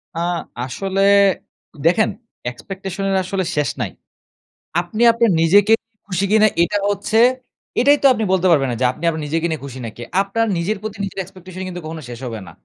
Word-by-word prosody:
আ - - -3 0.5
আসলে 190 +10 -2 0.8
দেখেন 195 +6 +4 0.4
expectation 190 +8 -6
এর 195 - +1
আসলে 190 +1 -2
শেষ 150 -1 +1
নাই। - - -2 0.9
আপনি 180 +6 -5
আপনার 230 -2 +2
নিজেকে 200 +6 +5
নিয়ে 225 -1 -52
খুশি 195 0 0
কিনা 215 0 +6 0.2
এটা 180 +4 0
হচ্ছে 205 +2 -1 0.6
এটাই 285 +4 +5
তো - - +8
আপনি 225 - -2
বলতে 185 0 +3
পারবেন 140 -5 +3
না - - -2
যে - - +3
আপনি 170 +6 -1 0.2
নিজেকে 165 +3 0
নিয়ে 160 - -3
খুশি 130 -2 -8
নাকি? 115 +1 -8 0.2
আপনার 200 +3 0
নিজের 190 +6 -1
প্রতি 215 -1 -6
নিজের 195 - -7
expectation 185 0 -12
ই - - -5
কিন্তু 180 -1 -6
কখনো 160 0 -6
শেষ 120 -1 -7
হবে 115 -3 -5
না। - - -10
185 Hz, 185 wpm, -19 LUFS, 165-205 Hz, 0.9 s, তো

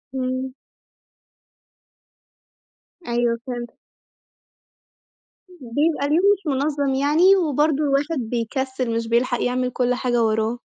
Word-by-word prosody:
إمم. 255 0 -2 2.6
أيوه 235 -1 0
فِهمت. 240 -1 -5 1.8
بيبقى 295 -1 -1
اليوم 320 +6 +2
مش 400 -2 -7
منظم 285 0 0
يعني، 310 +8 +4
وبرضه 305 -3 +1
الواحد 290 +2 0
بيكسل، 245 +1 -3
مش 230 0 -2
بيلحق 240 +1 +1
يعمل 250 0 0
كل 250 0 0
حاجة 240 -2 0
وراه. 220 +2 0
260 Hz, 95 wpm, -22 LUFS, 240-295 Hz, 2.6 s, يعني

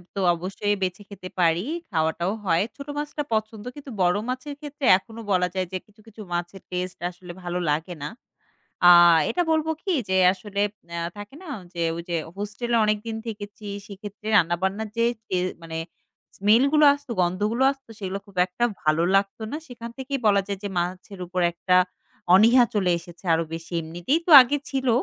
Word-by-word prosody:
তো - - -2 0.2
অবশ্যই 195 +4 -2
বেছে 185 +2 -2
খেতে 185 -2 -9
পারি, 170 +2 +3 0.3
খাওয়াটাও 160 +2 0
হয়। 170 0 +3
ছোট 280 0 -9
মাছটা 295 0 -3
পছন্দ 215 -1 -2
কিন্তু 285 -2 -9
বড় 180 +1 +3
মাছের 260 +3 -4
ক্ষেত্রে 290 -1 -5
এখনো 225 +4 -11
বলা 180 -1 +3
যায় 185 -1 -1
যে - - 0
কিছু, 210 +1 -23
কিছু 220 0 -12
মাছের 175 +2 -4
টেস্ট 180 0 -3
আসলে 180 0 -11
ভালো 175 0 -2
লাগে 160 +4 -1
না। 150 - -3 0.8
আ - - +10 0.4
এটা 360 - 0
বলবো 320 0 +1
কি, 385 - -1 0.2
যে 190 - +2 0.2
আসলে, 200 +1 -4 0.4
আ - - -1 0.2
থাকে 205 +6 -9
না? - - -11 0.3
যে 170 - -4
ওই 170 - -5
যে, 170 - 0 0.2
হোস্টেলে 215 +4 -2
অনেকদিন 215 +1 -1
থেকেছি 210 -1 -7 0.2
সেক্ষেত্রে 205 +1 -9
রান্নাবান্নার 190 +4 +1
যে 230 - +3 0.2
সে 185 - -1 0.2
মানে 165 -1 -6 0.6
স্মেলগুলো 265 +10 +4
আসত, 285 -2 -10
গন্ধগুলো 205 +8 0
আসত 270 -1 -13
সেগুলো 195 -1 -4
খুব 200 - -19
একটা 185 +6 -3 0.2
ভালো 155 +1 +2
লাগত 195 +2 +1
না। 295 - -2
সেখান 235 -3 -8
থেকেই 270 +1 -3
বলা 200 -1 +4
যায় 200 -2 -4
যে, - - -1
মাছের 185 +2 -3
উপর 180 +1 -2
একটা 180 +2 +1 0.6
অনীহা 230 +6 +7
চলে 190 -4 +2
এসেছে 175 +2 -15
আরো 165 +1 +2
বেশি। 165 +1 -7
এমনিতেই 175 - -1
তো - - +2
আগে 280 +3 0
ছিল 265 -2 0
200 Hz, 175 wpm, -24 LUFS, 180-235 Hz, 0.8 s, আ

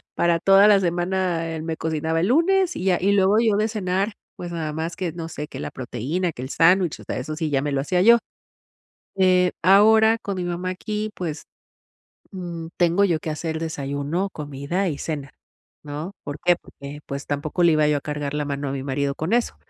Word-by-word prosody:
para 170 -1 +2
toda 195 +3 +6
la 205 -2 +6
semana, 175 -1 -1
él 160 - -5
me 160 0 -3
cocinaba 160 0 -1
el 180 - +1
lunes 355 - +3
y - - -4
ya. 185 -2 +3
Y 195 +2 +3
luego 200 +2 +4
yo, 225 -3 +3
de 215 +1 +2
cenar, 200 -1 -1 0.2
pues 175 -1 -6
nada 160 -3 -3
más 160 +2 -4
que 180 -3 -3
no 165 -1 -6
sé, 150 -2 -6
que - - -9
la - - -5
proteína, 135 +9 -3
que 125 - -8
el 130 - -6
sándwich, 175 +1 +3
o - - -12
sea, - - -4
eso 150 +5 -4
sí 160 -1 -2
ya 135 -2 +1
me 145 +1 -2
lo 135 - +1
hacía 180 +6 +1
yo. 235 +5 +7 1.0
Eh, 180 -1 +4
ahora 220 +4 +6
con 200 -3 -4
mi 180 - -3
mamá 175 +1 -3
aquí, 210 +3 -3
pues, 165 -4 -5 0.9
mm, 170 -3 -6
tengo 175 +3 +3
yo 170 -5 +2
que 160 - -4
hacer 160 +1 -3
el - - -4
desayuno, 150 +3 -2
comida 145 +6 -3
y 145 -4 -4
cena, 145 -4 -5 0.5
¿no? 150 +5 -6
¿Por 145 0 -6
qué? 175 - +5
Porque, 140 +1 -10
pues, 140 +1 -5
tampoco 150 +4 -2
le 170 -1 +5
iba 155 -1 +3
yo 150 -1 +2
a - - -10
cargar 145 -1 -4
la 150 0 -1
mano 140 0 -3
a - - -3
mi 135 -1 -4
marido 140 0 -1
con 160 +6 -3
eso. 240 -1 0
170 Hz, 220 wpm, -23 LUFS, 150-190 Hz, 1.0 s, yo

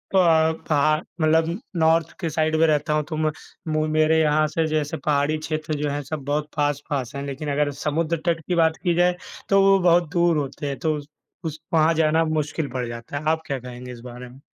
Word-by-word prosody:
प 160 -3 +3
पहा 155 0 +3 0.3
मतलब 160 +3 +2 0.2
नॉर्थ 160 0 +3
के 170 -4 -2
साइड 155 0 0
में 165 - +5
रहता 150 0 +1
हूँ 150 0 +1
तो 160 - -3
म 155 0 +1 0.4
मु 155 0 +1
मेरे 155 +1 +3
यहाँ 155 0 +3
से 160 +2 -1
जैसे 155 0 -1
पहाड़ी 150 0 +1
क्षेत्र 155 0 -3
जो 150 - 0
हैं 145 +1 -2
सब 145 +1 -5
बहुत 150 +1 -1
पास-पास 145 -3 -1
हैं, 140 - -4
लेकिन 140 +2 -4
अगर 145 0 +1
समुद्र 160 +2 0
तट 170 -1 +1
की 180 - 0
बात 160 -1 +3
की 175 -3 +2
जाए 175 +1 +3 0.3
तो 195 0 +5
वो 195 0 +5
बहुत 175 -2 +3
दूर 170 -2 +3
होते 145 0 -3
हैं 140 - -3
तो 155 -1 0
उस 145 -1 -9 0.4
उस 160 -1 -4
वहाँ 160 0 +4
जाना 160 0 +3
मुश्किल 155 -1 -1
पड़ 125 -2 -2
जाता 115 +4 -6
है। 150 - -5
आप 160 0 -1
क्या 135 -2 -2
कहेंगे 125 0 -9
इस 120 - -9
बारे 125 0 -9
में? 130 +2 -15
155 Hz, 220 wpm, -23 LUFS, 145-160 Hz, 0.4 s, में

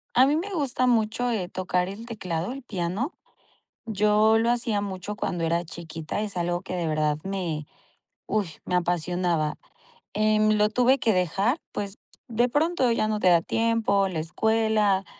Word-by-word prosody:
A 255 - +7
mí 285 +2 +2
me 365 +6 -2
gusta 265 -6 0
mucho 230 +1 +1
eh, 190 -6 -2
tocar 180 -1 -1
el 210 +4 -7
teclado, 185 -5 -3
el 275 +1 -7
piano. 200 - -3 0.7
Yo 210 +1 +3
lo 230 +1 +2
hacía 235 -4 +1
mucho 195 0 -5
cuando 175 -4 -2
era 170 +1 +1
chiquita. 165 +2 -5
Es 210 -3 -4
algo 175 0 -1
que 185 - -5
de 170 -2 -1
verdad 155 -1 +1
me 175 -6 -3 0.6
uy, 210 -3 0 0.2
me 180 - -1
apasionaba. 175 -2 0 0.6
Eh, 215 0 +3 0.2
lo 210 0 +3
tuve 250 +4 +3
que 220 - +2
dejar, 195 - +1
pues 200 0 -5 0.3
de 240 +1 +1
pronto 290 -1 +2
ya 230 -2 +1
no 215 -1 0
te 185 - +4
da 170 -2 +5
tiempo, 225 -4 +1
la 175 -4 -4
escuela, 210 +2 +1
205 Hz, 165 wpm, -26 LUFS, 175-230 Hz, 0.7 s, A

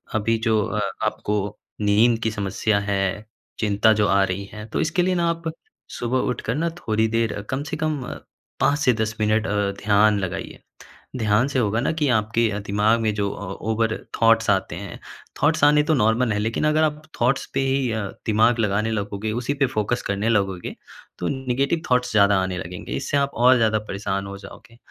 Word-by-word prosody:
अभी 115 +1 +1
जो 110 -1 +3
अ, 100 +2 -2 0.3
आपको 105 -1 -2 0.2
नींद 110 +3 +3
की 110 - +1
समस्या 105 0 0
है, 100 0 -1 0.3
चिंता 105 +1 +3
जो 105 -1 +2
आ 100 0 +4
रही 95 +1 -2
है, 105 0 -7
तो - - -2
इसके 165 +3 +1
लिए 185 +1 +1
ना 170 -1 +1
आप 170 0 -3 0.5
सुबह 120 +2 -1
उठकर 120 -1 -2
ना 165 +3 0
थोड़ी 110 -8 0
देर 115 -2 -1
कम 130 +2 -2
से 155 +1 -5
कम 155 -3 -1 0.6
5 145 - +3
से 130 -4 +3
10 110 0 -2
मिनट 110 +1 +2
अ, - - -2 0.3
ध्यान 105 0 +4
लगाइए। 95 0 -5 0.6
ध्यान 110 +2 +2
से 130 - 0
होगा 110 -1 +1
ना - - +1
कि 155 -2 0
आपके 110 0 +2 0.2
दिमाग 105 +3 +2
में 110 -1 +1
जो 100 -1 0
अ, 100 - -7 0.2
ओवर 110 +1 0 0.3
थॉट्स 115 -1 +4
आते 95 -5 +1
हैं। 100 0 -8 0.4
थॉट्स 155 0 +2
आने 150 0 +5
तो 155 - +1
नॉर्मल 110 +1 +2
है। 105 - -1
लेकिन 115 +2 -1
अगर 155 +1 +3
आप 150 -1 0 0.2
थॉट्स 125 +3 +2
पे 135 - 0
ही 135 -2 +1
अ, 110 0 -1 0.3
दिमाग 115 +2 +3
लगाने 105 +1 +1
लगोगे, 105 0 -3
उसी 120 +5 -2
पे 140 -1 +1
फोकस 120 0 -1
करने 100 +3 0
लगोगे 95 -5 -1 0.4
तो 90 - -2
नेगेटिव 135 +4 -1
थॉट्स 125 0 +2
ज़्यादा 100 -2 +4
आने 95 -1 -3
लगेंगे। 90 -5 -7
इससे 70 - -1
आप 140 0 +1
और 125 +2 +5
ज़्यादा 110 -2 +2
परेशान 100 -2 -4
हो 100 0 -7
जाओगे। 100 +4 -14
110 Hz, 195 wpm, -23 LUFS, 105-125 Hz, 0.6 s, आने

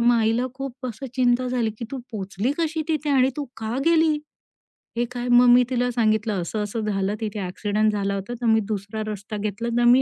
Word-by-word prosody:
मग 240 +1 +5
आईला 225 +3 +2
खूप 265 -1 -6
असं 245 +3 -6
चिंता 250 0 +2
झाली, 240 -3 0
की 235 - -4
"तू 270 - -4
पोचली 200 +4 -2
कशी 320 -1 0
तिथे 305 -2 0
आणि 265 -1 +4
तू 295 - -2
का 225 +2 -3
गेली?" 320 -2 +4 0.8
हे 240 - +2
काय 245 0 -4
मग 245 +1 +7
मी 245 +1 +7
तिला 245 -1 +1
सांगितलं, 215 -4 +1
"असं-असं 210 +5 -3
झालं 200 0 0
तिथे, 215 -1 -3
ॲक्सिडेंट 205 +3 0
झाला 200 -1 -1
होता 200 +5 -4
तर - - -2
मी 225 -1 +5
दुसरा 210 +1 -3
रस्ता 210 0 -5
घेतला 215 +3 -3
तर 240 - +3
मी 250 +2 +7
230 Hz, 205 wpm, -24 LUFS, 210-255 Hz, 0.8 s, मग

